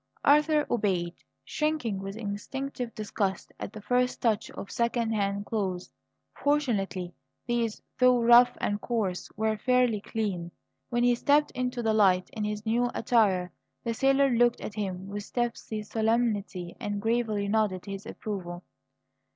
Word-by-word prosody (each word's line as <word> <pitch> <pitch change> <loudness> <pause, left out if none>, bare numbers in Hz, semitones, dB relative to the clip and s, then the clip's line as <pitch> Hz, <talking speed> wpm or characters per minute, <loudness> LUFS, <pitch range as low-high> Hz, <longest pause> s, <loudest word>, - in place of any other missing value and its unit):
Arthur 300 +1 +5
obeyed, 185 -7 0 0.3
shrinking 300 -10 -1
with 195 +2 -6
instinctive 235 +4 -5
disgust 205 -3 -2
at - - -5
the 215 -1 -10
first 250 +3 +1
touch 225 -3 +1
of 195 - -8
second 235 -1 0
hand 200 -1 -1
clothes. 190 -5 -3 0.4
Fortunately 205 -11 0 0.3
these, 235 -2 -1 0.2
though 250 -1 +5
rough 240 +1 +6
and 205 0 -1
coarse, 210 -7 -2
were 220 0 0
fairly 250 -4 +2
clean. 200 -6 -3 0.4
When 240 0 +1
he 245 0 +5
stepped 290 +4 +3
into 250 -1 -2
the 220 -1 +2
light 185 -4 +3
in 220 - -3
his 210 0 -3
new 240 +2 +2
attire, 190 -7 +2 0.3
the 230 - -1
sailor 270 +2 +3
looked 240 0 +3
at - - -5
him 190 -3 -4
with 205 +1 -6
tipsy 235 -3 -2
solemnity 220 -5 -1
and 205 -3 -3
gravely 220 -2 0
nodded 205 -3 0
his 200 +1 -6
approval. 180 -6 -5
220 Hz, 145 wpm, -28 LUFS, 200-240 Hz, 0.4 s, rough